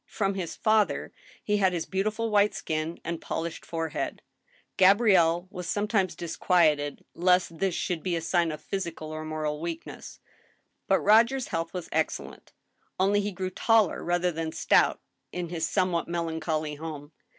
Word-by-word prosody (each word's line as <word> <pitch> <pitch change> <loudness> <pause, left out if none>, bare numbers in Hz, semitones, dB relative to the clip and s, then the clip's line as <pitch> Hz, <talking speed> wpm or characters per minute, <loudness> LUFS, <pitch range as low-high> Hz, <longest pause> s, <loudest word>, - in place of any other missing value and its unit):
From 195 -2 -1
his 185 -4 -4
father 215 -1 +1 0.3
he 210 0 +1
had 190 -2 +3
his 170 -2 -2
beautiful 215 +4 -1
white 205 0 +3
skin 155 +1 -3
and 170 -1 -3
polished 165 0 -4
forehead. 165 -2 -4 0.5
Gabrielle 185 -4 +4
was 180 -3 -6
sometimes 205 -2 0
disquieted 160 -4 +1
lest 180 -1 +2
this 190 -3 0
should 175 -3 -2
be 180 0 -1
a 165 - -2
sign 170 0 +1
of 150 - -7
physical 170 -5 -4
or 155 0 -5
moral 155 -1 -3
weakness. 170 -1 -7 0.7
But - - +3
Roger's 235 +5 +4
health 165 0 -2
was 180 -2 -5
excellent. - - -3 0.5
Only 200 +2 +3
he 205 +1 -2
grew 185 0 -4
tall 220 0 +4
rather 175 +1 0
than 160 -1 -3
stout - - +3 0.3
in 175 -2 -4
his 165 -2 -2
somewhat 185 -3 0
melancholy 160 -2 -2
home. 150 -1 -7
175 Hz, 150 wpm, -27 LUFS, 160-195 Hz, 0.7 s, Gabrielle